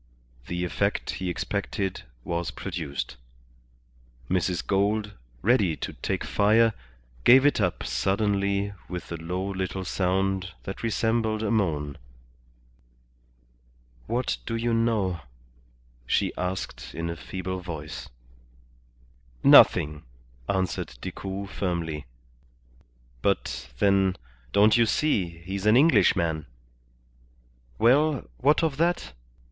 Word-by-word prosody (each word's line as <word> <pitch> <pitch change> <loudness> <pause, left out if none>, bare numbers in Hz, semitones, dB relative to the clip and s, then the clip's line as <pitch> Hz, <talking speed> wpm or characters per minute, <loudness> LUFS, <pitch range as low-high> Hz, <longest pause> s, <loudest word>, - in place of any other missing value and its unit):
The 90 0 -2
effect 100 +4 -1
he 95 -1 -3
expected 95 +2 -3 0.2
was 85 -2 -2
produced. 75 -4 -5 1.1
Mrs. 90 -1 0
Gould, 105 +2 +1 0.3
ready 105 -7 +3
to - - -5
take - - -3
fire, 110 +2 +3 0.5
gave 130 +3 +7
it 145 -6 +3
up 90 -3 0
suddenly 100 - 0 0.2
with 90 -1 -6
a 85 - -3
low 90 +4 -3
little 95 -1 -3
sound 95 0 0
that 95 - -6
resembled 110 -1 0
a 105 - 0
moan. 75 -9 0 2.1
"What 120 +3 -1
do 115 - -2
you 115 +1 0
know?" 110 -6 +1 0.9
she - - +1
asked 90 -9 -4
in 85 0 -3
a 85 - -3
feeble 95 +2 -5
voice. 80 -4 -7 1.3
"Nothing," 75 0 +7 0.5
answered 95 -9 -1
Decoud, 100 +1 -5
firmly. 85 -6 -3 1.1
"But, - - -1
then, 95 +2 +3 0.4
don't 105 +3 +5
you 115 -1 +4
see, 90 - 0
he's 95 +2 -3
an 110 +3 +6
Englishman?" 85 - +3 1.3
"Well, 140 +5 +3
what 150 +5 +3
of 155 -4 0
that?" 170 - 0
95 Hz, 105 wpm, -26 LUFS, 85-110 Hz, 2.1 s, gave